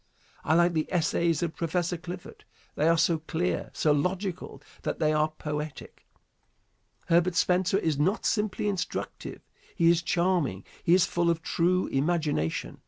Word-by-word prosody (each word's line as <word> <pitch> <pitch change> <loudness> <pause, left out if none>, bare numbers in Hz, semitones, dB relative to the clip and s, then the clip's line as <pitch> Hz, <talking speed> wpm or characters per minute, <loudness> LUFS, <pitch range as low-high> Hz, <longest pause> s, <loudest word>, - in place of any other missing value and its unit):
I 160 - +2
like 175 +1 +4
the 155 -1 -1
essays 170 -1 +1
of 165 -2 -3
Prof. 165 0 -4 0.3
Clifford. 175 +2 -9 0.3
They 155 - +1
are 165 - +4
so 165 0 +2
clear, 160 +3 -2
so 155 - +1
logical 180 +5 -2 0.2
that - - -3
they 155 -1 +2
are 155 0 +2
poetic. 150 -1 -7 1.0
Herbert 170 +1 +2
Spencer 180 +1 +2
is 160 -7 0
not 190 +9 +1
simply 210 -1 0
instructive, 195 -3 -4 0.3
he 170 -2 +5
is 170 0 +2
charming. 170 - 0 0.2
He 170 - +5
is 185 -1 +4
full 170 -1 0
of 165 -1 0
true 180 +2 +1
imagination. 145 - -1
170 Hz, 150 wpm, -27 LUFS, 155-180 Hz, 1.0 s, he